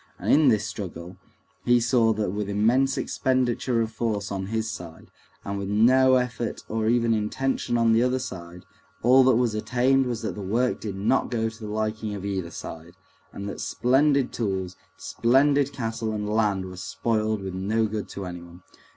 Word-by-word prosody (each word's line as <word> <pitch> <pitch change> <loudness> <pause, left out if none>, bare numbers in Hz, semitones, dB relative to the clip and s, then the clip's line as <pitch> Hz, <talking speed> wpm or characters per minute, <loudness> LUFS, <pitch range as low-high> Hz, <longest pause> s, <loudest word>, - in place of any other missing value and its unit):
And - - +1
in 150 0 +5
this 110 -5 +3
struggle 90 -2 -7 0.5
he 120 0 +4
saw 120 -1 +3
that 105 -3 -2
with 105 0 -3
immense 120 +7 +2
expenditure 125 -2 0
of 110 -1 -2
force 110 -3 -2
on 95 -1 -3
his 110 +1 -2
side, 90 -7 -9 0.3
and 100 0 -3
with 100 - -4
no 130 +5 +5
effort 125 -2 -2
or 110 0 -1
even 115 -1 +2
intention 120 +3 -1
on 115 -1 +3
the 115 - +4
other 125 +1 +2
side, 90 -8 -8 0.4
all 130 +3 +6
that 130 -2 +5
was 120 -2 +1
attained 130 +4 +1
was 120 -2 -3
that 110 - -2
the 105 - -7
work 115 +6 0
did 105 -3 -5
not 105 +7 +1
go 115 -2 -1
to 110 +1 -14
the 105 -2 -6
liking 110 0 -2
of 100 0 -7
either 95 -4 -3
side, 85 +1 -9 0.4
and 100 - -7
that 100 - -6
splendid 135 +1 +2
tools, 95 -5 -2 0.2
splendid 140 +3 +2
cattle 115 -4 -3
and 105 -1 -3
land 105 -3 +1
were 90 -1 -9
spoiled 110 +2 -1
with 95 -1 -5
no 105 +4 0
good 105 -1 -4
to 100 - -6
anyone. 90 0 -9
110 Hz, 185 wpm, -25 LUFS, 100-125 Hz, 0.5 s, all